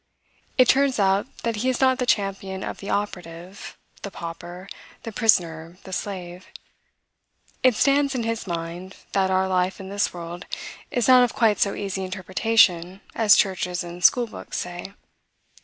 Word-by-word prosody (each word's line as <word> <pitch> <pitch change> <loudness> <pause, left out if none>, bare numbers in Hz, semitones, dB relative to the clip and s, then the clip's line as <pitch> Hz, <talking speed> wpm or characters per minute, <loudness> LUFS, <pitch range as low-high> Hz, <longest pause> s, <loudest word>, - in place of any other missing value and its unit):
It 255 -2 +6
turns 275 +1 +3
out 195 +1 +2 0.2
that 230 -2 -1
he 250 +5 0
is 255 - -1
not 260 -1 +3
the 250 - -1
champion 195 -3 -1
of - - -5
the 200 - -7
operative, 180 -2 -5 0.2
the 200 - -5
pauper, 175 +1 -8 0.4
the 225 - -6
prisoner, 170 -7 +1
the 190 - -9
slave. 180 -2 -5 1.1
It 255 -3 +4
stands 280 +2 +2
in 240 - -1
his 225 -2 -3
mind, 170 +2 -5 0.2
that 190 -1 +1
our 190 0 +2
life 185 +1 0
in 190 -1 -8
this 200 +1 0
world 175 +1 -8 0.4
is 245 -3 0
not 255 -1 +8
of 245 - -1
quite 220 -3 +3
so 200 - +2
easy 195 -1 -4
interpretation 185 -1 +2
as 215 -2 +5
churches 185 -2 0
and 175 +1 -9
school 245 -1 +5
books 225 - -8
say. 175 +3 -6
195 Hz, 160 wpm, -24 LUFS, 180-225 Hz, 1.1 s, not